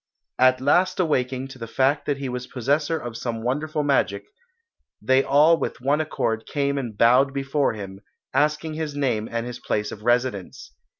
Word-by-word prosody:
At 130 0 +5
last 175 +9 +2
awaking 130 -5 0
to 130 -1 -12
the 115 - -6
fact 135 +5 +1
that 145 - 0
he 140 -1 -4
was 125 0 -5
possessor 145 +6 0
of 120 -6 -7
some 115 -1 -4
wonderful 150 +5 -1
magic, 100 -8 +1 0.8
they 130 +1 +3
all 150 +4 +5
with - - -3
one 140 +4 +1
accord 115 -7 -2
came 140 -1 -1
and 115 -6 -6
bowed 130 +5 +4
before 140 0 0
him, 100 -2 -8 0.3
asking 150 +1 +1
his 155 -2 -4
name 125 -6 -1
and 115 0 -2
his 120 0 -7
place 105 0 -2
of 105 - -9
residence. 120 -4 -1
130 Hz, 175 wpm, -23 LUFS, 120-145 Hz, 0.8 s, At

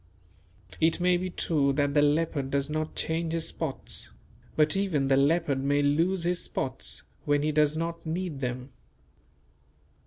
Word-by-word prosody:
It 160 +1 +2
may 180 0 +3
be 185 +1 -2
true 145 -5 +1
that 145 0 +1
the 145 - +4
leopard 145 -2 +1
does 140 +1 0
not 155 0 -3
change 160 0 -1
his 165 -1 -1
spots; 155 -5 -2 0.5
but 155 +1 +3
even 165 -9 0
the 135 - +5
leopard 140 -1 +2
may 145 +1 +2
lose 165 +6 +1
his 175 +1 0
spots 130 0 -2 0.2
when 145 -1 +2
he 155 - +1
does 150 0 +2
not 165 0 -3
need 165 -2 -3
them. 125 0 -4
155 Hz, 155 wpm, -28 LUFS, 140-165 Hz, 0.5 s, the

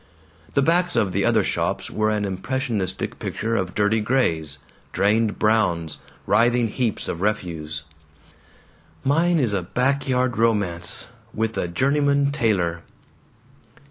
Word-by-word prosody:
The 140 - +4
backs 175 +3 +2
of 100 - +2
the - - 0
other - - +3
shops - - -1
were 110 0 +1
an 105 -1 0
impressionistic 105 0 -3
picture 115 +1 -2
of 90 -4 -2
dirty 105 +2 +2
grays, 85 - 0 0.4
drained 105 +2 +2
browns, 90 -8 +1 0.3
writhing 120 0 +3
heaps 115 -1 -1
of 85 - -4
refuse. 80 -8 -2 1.2
"Mine 165 +5 +3
is 120 -8 +1
a 100 - 0
back 135 +9 0
yard 125 -2 +1
romance 100 -7 +1 0.3
with 110 0 -1
a - - -1
journeyman 140 +7 +2
tailor!" 95 - 0
110 Hz, 125 wpm, -23 LUFS, 95-130 Hz, 1.2 s, The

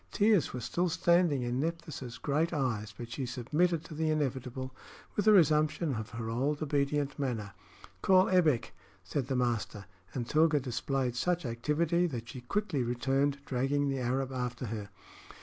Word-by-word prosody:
Tears 205 - +3
were 125 - -5
still 175 +9 0
standing 170 -5 +3
in 120 +1 -1
Nephthys' 155 -6 -4
great 155 +4 0
eyes, 115 -8 -1
but 120 -1 -7
she 130 +2 -3
submitted 150 +7 0
to 165 - -9
the 160 +1 0
inevitable 130 -3 -2 0.4
with 205 - 0
a - - +9
resumption 155 -4 +4
of 110 -2 -4
her 115 -1 -5
old 140 +7 0
obedient 145 -1 0
manner. 115 -7 -2 0.5
"Call 185 0 +5
Ebbek," 155 -11 +2 0.3
said 125 +7 -2
the 135 - -1
master; 120 -5 -1 0.3
and 120 -3 -2
Tilga 155 +1 +4
displayed 130 0 -1
such 175 +4 0
activity 155 +9 +1
that 120 -7 -5
she 125 0 -8
quickly 180 - -1
returned, 135 +4 0
dragging 140 +2 0
the 135 -1 -1
Arab 130 +2 -1
after 125 -1 -3
her. 105 -3 -5
135 Hz, 160 wpm, -31 LUFS, 125-155 Hz, 0.5 s, a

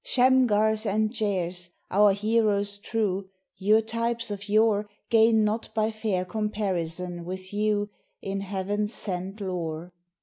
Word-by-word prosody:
Shamgars 225 -4 +3
and 215 +2 +1
Jairs! 180 -4 -1 0.2
our 205 +1 +5
heroes 205 -1 +1
true, 200 -3 -2 0.3
Your 215 +3 +4
types 230 0 -2
of 205 0 -6
yore 210 -1 +3 0.2
Gain 225 -1 +5
not 215 +2 -1
by 220 0 +1
fair 215 -4 -1
comparison 180 -4 -2
with 185 +2 -6
you, 205 0 0 0.3
In 195 0 -3
heaven 200 +2 -2
sent 195 -1 -5
lore. 175 -3 -4
205 Hz, 125 wpm, -26 LUFS, 190-220 Hz, 0.3 s, our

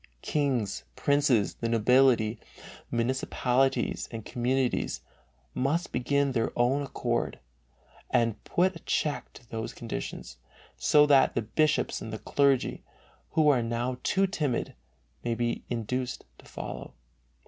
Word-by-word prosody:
Kings, 125 -9 0
princes, 140 -7 +2
the 115 - -3
nobility, 115 -1 +4 0.5
municipalities 130 +2 0
and 115 -2 -6
communities 125 +1 0 0.5
must 150 +7 0
begin 140 +3 +1
of - - -3
their 115 -2 0
own 125 +4 +2
accord 140 - -2 0.7
and 115 -2 +1
put 185 +1 +1
a - - -8
check 150 -2 -1
to 120 - -15
these 115 0 -5
conditions, 65 - -6 0.4
so 150 0 +5
that 140 -2 +5
the 120 - 0
bishops 150 +8 +1
and 110 - -6
the 110 - -4
clergy, 140 +2 +1 0.5
who 155 -1 +4
are 130 -4 +4
now 120 +2 -2
too 195 +1 +2
timid, 150 -10 -1 0.5
may 120 -1 0
be 120 0 -2
induced 125 +2 -3
to - - -16
follow. - - -7
125 Hz, 125 wpm, -28 LUFS, 115-140 Hz, 0.7 s, so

